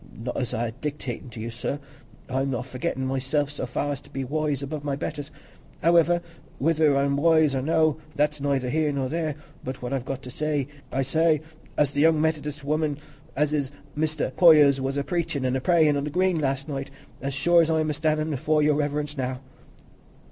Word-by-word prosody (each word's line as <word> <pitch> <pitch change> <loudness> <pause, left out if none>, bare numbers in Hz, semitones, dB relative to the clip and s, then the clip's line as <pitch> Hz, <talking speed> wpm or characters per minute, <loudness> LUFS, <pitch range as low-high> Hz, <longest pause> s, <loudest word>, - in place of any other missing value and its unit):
Not 120 +3 -4
as 125 - -2
I'm 115 +1 -1
a - - -6
dictatin' 135 -1 -5
to 120 -1 -9
you, 115 +2 -4
sir; 120 +4 -3 0.5
I'm 135 +1 -1
not 125 -2 -2
forgettin' 130 0 -3
myself 135 +2 0
so 140 -3 -4
far 145 +4 -1
as 140 - -4
to - - -18
be 135 - -4
wise 145 0 -1
above 145 +1 -5
my 140 -1 -1
betters. 145 +1 -5 0.5
Howiver, 170 +1 +4 0.3
whether 155 -1 +3
I'm 140 0 +2
wise 160 -1 +4
or 135 - 0
no, 155 +1 +2 0.2
that's 150 0 +1
neither 140 -2 0
here 155 0 +1
nor 135 -2 -1
there, 160 -1 -1 0.3
but 130 0 -6
what 125 - -3
I've 135 -3 -1
got 135 +1 -5
to 125 - -8
say 150 -1 -1 0.2
I 135 - 0
say—as 155 0 0
the 145 - 0
young 160 0 +5
Methodis 150 -2 -1
woman 150 0 0 0.4
as 150 +1 +1
is 145 -3 +1
at 140 - -19 0.2
Mester 155 -2 -1
Poyser's 150 -6 +7
was 135 +1 -1
a 140 - 0
preachin' 145 -3 -2
an' 130 0 +1
a 130 - -1
prayin' 160 -2 +4
on 140 0 -1
the - - -2
Green 180 +2 +1
last 135 -1 -1
night, 140 -2 -4 0.3
as 135 0 -3
sure 170 +4 +5
as 165 - +1
I'm 155 -1 +1
a - - -1
stannin' 155 +1 0
afore 150 +3 +2
Your 150 -1 +3
Reverence 150 0 -1
now." 130 -2 -2
145 Hz, 205 wpm, -25 LUFS, 135-155 Hz, 0.5 s, Poyser's